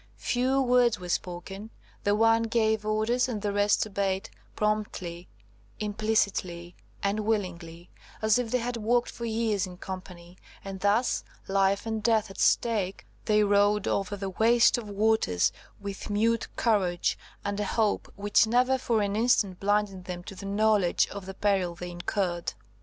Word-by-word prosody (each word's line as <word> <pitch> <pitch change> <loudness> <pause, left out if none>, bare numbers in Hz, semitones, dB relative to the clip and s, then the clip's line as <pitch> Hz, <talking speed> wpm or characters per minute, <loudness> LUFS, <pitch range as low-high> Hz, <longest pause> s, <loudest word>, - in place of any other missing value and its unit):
Few 255 +2 +1
words 245 -4 +3
were 180 -1 -8
spoken; 190 +5 -4 0.4
the 205 0 +3
one 225 +1 +4
gave 220 -2 +1
orders, 230 +4 +1
and 225 -4 -2
the 205 - 0
rest 205 +1 +2
obeyed–promptly, 195 -2 -3 0.5
implicitly, 200 -5 -1 0.3
and 200 +2 0
willingly, 180 -6 -3 0.3
as 220 +2 +3
if 245 -2 -2
they 250 - +2
had 245 0 -3
worked 235 +2 +1
for 235 - -6
years 220 -4 0
in 180 -1 -10
company; 180 -1 -9 0.3
and 195 -1 -6
thus, 205 +5 +1 0.2
life 195 +1 +2
and 220 -1 -2
death 215 -2 +2
at - - -11
stake, 205 -5 +1 0.2
they 210 0 +4
rowed 205 0 +3
over 200 +1 -1
the 195 -1 -4
waste 230 +4 +4
of 215 -3 -8
waters 205 - +2 0.3
with 200 0 -6
mute 225 +2 +1
courage, 190 -7 +1 0.3
and 200 0 -2
a 210 - 0
hope 215 +1 0
which 205 +2 +3
never 250 +3 +3
for 225 -4 +1
an 200 0 -1
instant 215 -5 +2
blinded 200 -2 0
them 180 -1 -6
to 195 - -9
the 195 +1 -8
knowledge 205 -3 +3
of 200 -2 -8
the 190 - -7
peril 190 -4 +1
they 180 0 -7
incurred. 175 0 -2
205 Hz, 155 wpm, -28 LUFS, 190-220 Hz, 0.5 s, one